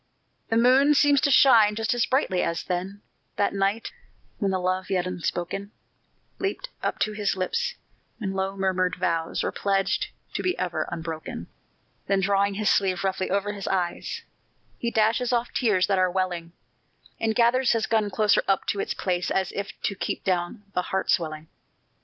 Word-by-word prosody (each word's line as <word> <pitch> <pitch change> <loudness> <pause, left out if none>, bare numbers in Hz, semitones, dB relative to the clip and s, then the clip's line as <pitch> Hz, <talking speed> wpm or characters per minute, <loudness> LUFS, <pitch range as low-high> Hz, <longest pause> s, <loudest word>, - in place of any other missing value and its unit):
The 225 - +2
moon 265 +5 +5
seems 285 -1 +4
to - - +2
shine 225 -7 +6
just 225 +1 0
as 240 -1 +1
brightly 255 -9 +1
as 170 - -1
then, 190 +3 -4 0.3
That 200 - +1
night, 200 +3 0 0.5
when 200 - +1
the 190 - +1
love 185 +1 -1
yet 185 -2 +1
unspoken 180 +2 -3 0.7
Leaped 400 +6 -3
up - - -1
to 215 - +2
his 210 -2 -1
lips 470 - -1 0.4
when 195 -4 -3
low 195 +1 -2
murmured 185 -1 +1
vows 165 -1 -1
Were - - -1
pledged 195 -1 0 0.3
to - - -2
be 365 0 0
ever 180 -2 -2
unbroken. 160 - -5 0.6
Then 195 0 +2
drawing 200 +1 +2
his 210 +1 +2
sleeve 190 -2 +1
roughly 190 -1 -1
over 200 +2 0
his 200 -2 -6
eyes, 180 -2 -2 0.6
He 235 - -1
dashes 230 +3 +2
off 240 0 0
tears 210 -7 +2
that 195 -2 +1
are 185 0 +3
welling, 175 -2 -2 0.7
And 220 -1 0
gathers 245 +2 +4
his 225 -1 +1
gun 215 -2 +1
closer 210 +1 +3
up 195 -1 +2
to 200 - -1
its - - -2
place 180 -1 -1
As 190 -1 0
if 200 0 -6
to - - 0
keep 195 - -4
down 185 +3 -1
the 180 - +1
heart 190 +1 -1
swelling. 155 -2 -1
195 Hz, 175 wpm, -25 LUFS, 185-225 Hz, 0.7 s, shine